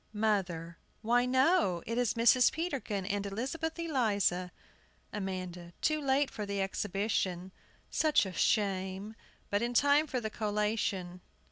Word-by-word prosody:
MOTHER. 185 -6 -1 0.2
Why, 245 +2 +3
no. 260 - +3
It 230 - -3
is 245 -2 +1
Mrs. 240 +2 +5
Peterkin 265 - -3
and 200 0 -1
Elizabeth 270 - -3
Eliza! 205 - 0 0.6
AMANDA. 185 -4 -5
Too 310 -1 +1
late 275 0 +2
for 210 - -5
the 200 -1 -3
exhibition. 195 -2 -1 0.4
Such 310 -8 +3
a 190 - -6
shame! 195 0 0 0.4
But 205 +1 +1
in 240 +1 -2
time 285 +4 +4
for 255 - -2
the 220 -2 -4
collation. 210 -4 -1
210 Hz, 130 wpm, -31 LUFS, 190-255 Hz, 0.6 s, Mrs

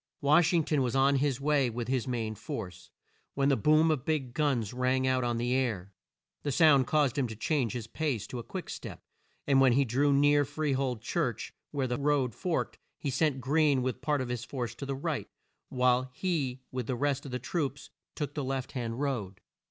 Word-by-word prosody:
Wash 155 +3 +4
ing 170 -3 +3
ton 150 -2 +1
was 125 -1 0
on 135 +1 +4
his 135 -2 0
way 140 -2 +2
with 120 0 -4
his 130 -1 -1
main 115 -3 -2
force, 90 -4 -7 0.5
when 140 0 +2
the 140 - +4
boom 155 +3 +4
of 145 -5 -1
big 140 -5 -1
guns 130 -8 0
rang 130 +1 +1
out 130 -1 +2
on 120 -1 0
the 120 +1 0
air. 110 -8 -1 0.5
The 145 - -2
sound 140 -3 +5
caused 145 -3 +2
him 130 - +1
to 110 - -7
change 125 +1 0
his 120 -3 -4
pace 130 -2 -2
to 125 - -6
a - - -6
quick 115 - -6
step, - - -8 0.4
and 135 -2 +4
when 130 -2 +5
he 140 +2 +3
drew 135 +5 +2
near 145 +1 +4
Free 150 +1 -1
hold 130 -4 -1
church, 140 -4 -2 0.2
where 140 -3 -1
the 125 +2 -2
road 140 -4 +1
forked, 175 - -2 0.2
he 140 - -3
sent 135 0 +1
Greene 140 -1 +2
with 130 0 -2
part 145 -1 0
of 125 - -4
his 120 -1 -3
force 120 -3 -4
to 140 +3 -7
the 135 - -2
right, 135 - -3 0.4
while 125 0 +2
he 140 -9 -2
with 125 -3 -4
the 130 - -1
rest 140 +2 0
of - - -8
the 125 - -1
troops 140 -1 -3 0.2
took 145 -2 -3
the 145 - -3
left 130 -1 -3
hand 120 -2 -4
road. 110 -10 -2
135 Hz, 215 wpm, -30 LUFS, 125-145 Hz, 0.5 s, sound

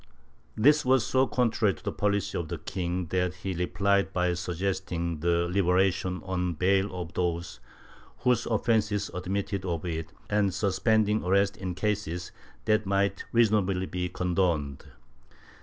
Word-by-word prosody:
This 150 +7 +5
was 130 -2 +3
so 130 0 +2
contrary 115 -5 +1
to - - -17
the - - -2
policy 100 -1 -1
of 85 - -2
the 85 +1 -4
king 90 +2 -3
that 90 0 0
he 95 +1 -4
replied 100 +3 +1
by 90 -1 +1
suggesting 90 -2 -2
the 85 +1 +1
liberation 90 0 +1
on 90 -2 -1
bail 95 +4 +2
of 85 -1 -6
those 85 -7 -2 0.6
whose 125 -2 +2
offences 110 -2 +1
admitted 95 +2 -3
of 85 -3 -3
it, 80 -2 -4 0.2
and 105 -3 +1
suspending 105 +2 +2
arrest 100 +2 +2
in 90 -2 -5
cases 95 -4 -2 0.3
that 110 -2 +2
might 100 0 0
reasonably 105 -5 +2
be 90 -1 -3
condoned. 85 -6 -1
95 Hz, 140 wpm, -28 LUFS, 90-105 Hz, 0.6 s, This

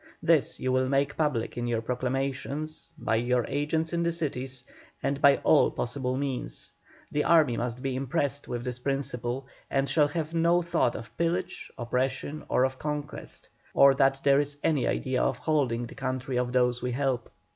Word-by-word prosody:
This - - +3
you 130 - 0
will 130 0 +2
make 140 +1 +1
public 130 -7 -1
in 120 - -2
your 115 -1 -1
proclamations, 135 +5 -3
by 115 -6 0
your 120 +1 +1
agents 160 +3 -1
in 170 - +1
the 170 0 +1
cities, 135 -6 -4 0.4
and 140 0 -1
by 140 -1 +7
all - - +5
possible 125 +1 -2
means. 135 -2 -3 0.4
The 150 - +1
army 155 -8 +4
must 120 +1 -3
be 135 -1 -1
impressed 135 +2 -1
with 120 -1 -3
this 125 0 -4
principle, 130 -1 -2 0.2
and 135 0 +1
shall 150 -1 +3
have 155 +1 -3
no 170 +1 +3
thought 165 -8 +1
of 115 - -8
pillage, 175 +2 -1
oppression, 130 +5 -2
or 125 - +3
of 130 0 -1
conquest, 150 -1 -5 0.3
or 140 0 +7
that 135 0 +3
there 140 0 +5
is 145 0 -2
any 150 -6 +2
idea 130 -1 0
of - - +1
holding 130 -7 0
the - - -10
country 130 0 -3
of 125 0 -1
those 125 -1 +2
we 125 -1 -2
help." 130 -2 -1
135 Hz, 180 wpm, -28 LUFS, 125-145 Hz, 0.4 s, by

